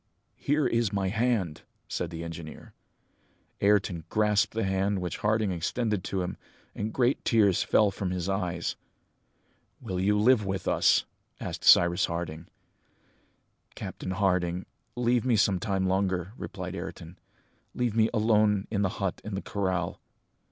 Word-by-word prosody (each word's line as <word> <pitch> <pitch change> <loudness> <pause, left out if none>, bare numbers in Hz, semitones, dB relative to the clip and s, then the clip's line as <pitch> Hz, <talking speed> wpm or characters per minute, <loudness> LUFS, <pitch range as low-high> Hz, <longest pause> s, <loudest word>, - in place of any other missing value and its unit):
"Here 145 +1 +1
is 115 -4 +1
my 100 -2 0
hand!" 110 -7 0 0.3
said 85 - -3
the 85 0 -6
engineer. 80 -1 -8 0.9
Ayrton 100 -5 +2
grasped 105 -1 +2
the 115 - -1
hand 95 +1 0
which 90 -3 -3
Harding 105 -1 +1
extended 105 +3 -1
to 95 -2 -1
him, 90 - -5 0.4
and 105 +1 -3
great 125 +3 +1
tears 105 -6 +3
fell 105 -2 +3
from 95 -1 -3
his 90 -1 -3
eyes. 90 -3 -2 1.0
"Will 95 -7 -4
you 105 +3 +2
live 110 +1 +4
with 95 -1 -3
us?" - - +3 0.3
asked - - -5
Cyrus 85 +1 +6
Harding. 85 -1 -5 1.3
"Captain - - -6
Harding, 90 -2 0 0.3
leave 120 -1 +2
me 125 -2 +2
some 100 -3 +3
time 95 -1 -1
longer," 95 0 0
replied - - -6
Ayrton, 85 +2 -8 0.6
"leave 120 -3 -1
me 110 -1 +4
alone 105 -3 +3
in 100 -2 0
the 100 - +2
hut 95 -3 -2
in 105 -2 -5
the 95 - -3
corral!" 95 -4 -2
100 Hz, 145 wpm, -28 LUFS, 90-110 Hz, 1.3 s, Cyrus